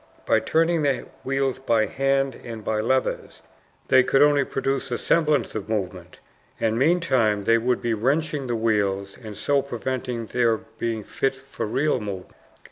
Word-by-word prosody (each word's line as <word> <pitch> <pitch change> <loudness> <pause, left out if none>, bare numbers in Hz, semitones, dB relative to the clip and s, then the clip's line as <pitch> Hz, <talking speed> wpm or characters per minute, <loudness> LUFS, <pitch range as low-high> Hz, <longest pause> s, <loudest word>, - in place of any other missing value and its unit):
By - - +4
turning 165 +1 +1
the 140 -3 0 0.2
wheels 135 -1 -1
by 115 -4 +2
hand 135 +1 0
and 115 -3 -8
by 110 -1 0
levers 130 +4 -1 0.4
they 130 -1 +6
could 135 +2 +4
only 145 -1 +4
produce 135 0 -2
a 120 - -1
semblance 155 -3 +1
of 110 -1 -5
movement, 90 -4 -4 0.4
and 110 -1 +1
meantime 130 - +2
they 115 +2 +4
would 125 +2 0
be 120 -1 +1
wrenching 140 +5 0
the 120 - -1
wheels 100 -3 0
and 105 -2 -8
so 140 -1 +2
preventing 125 -2 -4
their 115 0 +1
being 110 0 -5
fit 135 +5 -1
for 135 -4 -6
real 135 +4 +1
movement. 100 -4 -6
125 Hz, 160 wpm, -24 LUFS, 110-135 Hz, 0.4 s, they